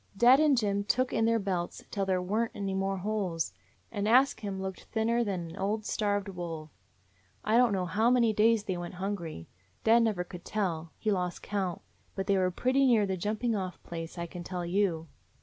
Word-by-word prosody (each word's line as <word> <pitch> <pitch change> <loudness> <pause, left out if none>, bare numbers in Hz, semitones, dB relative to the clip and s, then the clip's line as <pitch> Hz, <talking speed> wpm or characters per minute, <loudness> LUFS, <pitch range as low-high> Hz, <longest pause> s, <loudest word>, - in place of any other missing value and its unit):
Dad 245 +5 +7
and 300 -3 +4
Jim 200 -3 +1
took 255 +5 +1
in 225 - +2
their 230 0 +3
belts 185 -4 -3
till 195 -2 -1
there 185 -1 +1
were 215 +5 +1
n't - - -11
any 195 -1 -2
more 195 0 -1
holes, 185 - -2 0.4
and 205 -2 -2
Ask 260 +5 +4
Him 200 -3 -4
looked 190 -1 -5
thinner 230 +1 +1
than 180 -6 -3
an - - -10
old 210 +2 -1
starved 205 -1 0
wolf. 165 -5 -6 0.7
I 215 - +2
don't 245 -1 +5
know 190 -2 0
how 215 +7 +2
many 240 -3 +4
days 220 0 +4
they 190 -3 -2
went 175 +1 -6
hungry. 180 - -4 0.4
Dad 230 +2 +6
never 215 -6 +1
could 180 0 -10
tell; 170 -6 -2
he 215 - 0
lost 180 -2 -2
count: 195 -4 -2 0.3
but 195 - -2
they 200 - +2
were 185 -1 +2
pretty 260 +8 +2
near 225 -5 +4
the 190 -1 -1
jumping 215 +5 -1
off 185 -3 -3
place, 165 0 -7
I 170 - -3
can 175 +1 -8
tell 180 -1 -4
you." 175 -3 0
200 Hz, 205 wpm, -30 LUFS, 180-220 Hz, 0.7 s, Dad